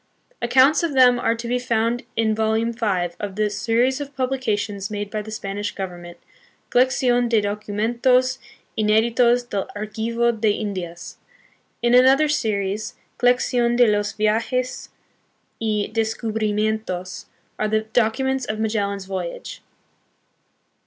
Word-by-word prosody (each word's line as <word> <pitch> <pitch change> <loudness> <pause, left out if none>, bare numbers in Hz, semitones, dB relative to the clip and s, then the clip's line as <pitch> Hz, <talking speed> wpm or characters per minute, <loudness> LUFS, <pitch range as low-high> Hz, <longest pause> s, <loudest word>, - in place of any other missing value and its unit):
Accounts 260 +5 +4
of 335 -4 -1
them 250 -2 +5
are 230 - +1
to 235 +1 -6
be 250 +1 0
found 235 0 0
in 220 -1 +2
volume 220 +1 0
five 185 -7 -1
of 200 -2 -5
the 210 0 0
series 240 +6 +1
of 285 0 -7
publications 220 -7 -2
made 205 -1 -5
by 215 - -2
the 215 - -10
Spanish 205 -1 -4
Govern 180 -3 -5
ment, 175 0 -11 0.5
Colecdon 245 -1 +2
de 230 -2 +4
Documentos 235 +5 +1 0.4
Ineditos 235 +3 +3
del 195 -1 -2
Archivo 225 +3 -1
de 220 -1 0
Indias. 185 -5 -5 0.7
In 240 0 +3
another 265 +4 +6
series, 215 -7 -1 0.2
Colecdon 245 -1 +2
de 245 - +6
los 205 -1 +1
Viajes 230 +4 -1 0.7
y 215 -2 0
Des 225 0 0
cubrimientos, 215 -4 -2 0.3
are 215 - +1
the 215 0 +1
documents 245 +4 0
of 215 -1 -4
Magellan's 200 -3 -1
voyage. 185 -3 -6
220 Hz, 130 wpm, -22 LUFS, 205-245 Hz, 0.7 s, another